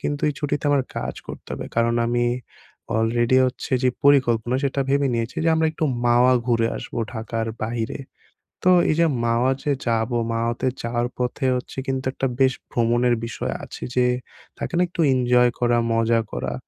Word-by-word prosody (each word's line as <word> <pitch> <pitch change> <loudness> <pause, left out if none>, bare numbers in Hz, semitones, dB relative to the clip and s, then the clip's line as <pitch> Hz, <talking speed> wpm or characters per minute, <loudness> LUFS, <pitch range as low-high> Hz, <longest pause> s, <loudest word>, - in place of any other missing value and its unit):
কিন্তু 145 0 -3
এই 150 - -2
ছুটিতে 145 0 -2
আমার 140 -2 +3
কাজ - - -3
করতে - - -9
হবে। - - -5
কারণ 115 0 +2
আমি 120 0 +1 0.7
অলরেডি 120 +3 +2
হচ্ছে 125 +1 -5
যে - - +5 0.2
পরিকল্পনা 125 -3 +3
সেটা 140 0 0
ভেবে 140 0 +2
নিয়েছি 115 +1 -3
যে 165 - +3
আমরা 160 0 +2
একটু 160 - -2 0.2
মাওয়া 120 +2 +5
ঘুরে 115 -2 +2
আসবো 120 - -6
ঢাকার 115 0 -3 0.2
বাহিরে। 115 +2 -3 0.7
তো 185 - +6 0.2
এইযে 165 +2 +3 0.2
মাওয়া 120 +3 +2
যে 145 - +1
যাবো 115 +1 0 0.2
মাওয়াতে 115 +2 -1 0.2
যাওয়ার 120 +1 -1
পথে 125 +2 -1
হচ্ছে 125 +1 -7
কিন্তু 130 0 -2
একটা 135 - -2
বেশ 130 0 +5 0.2
ভ্রমণের 120 +1 +2
বিষয় 120 - -4
আছে - - -11
যে, 125 0 +4 0.5
থাকে - - -5
না - - +4
একটু 175 - -5
এনজয় 125 -1 +4
করা, 120 0 +3 0.2
মজা 115 0 +2
করা? - - -3
120 Hz, 170 wpm, -23 LUFS, 115-135 Hz, 0.7 s, তো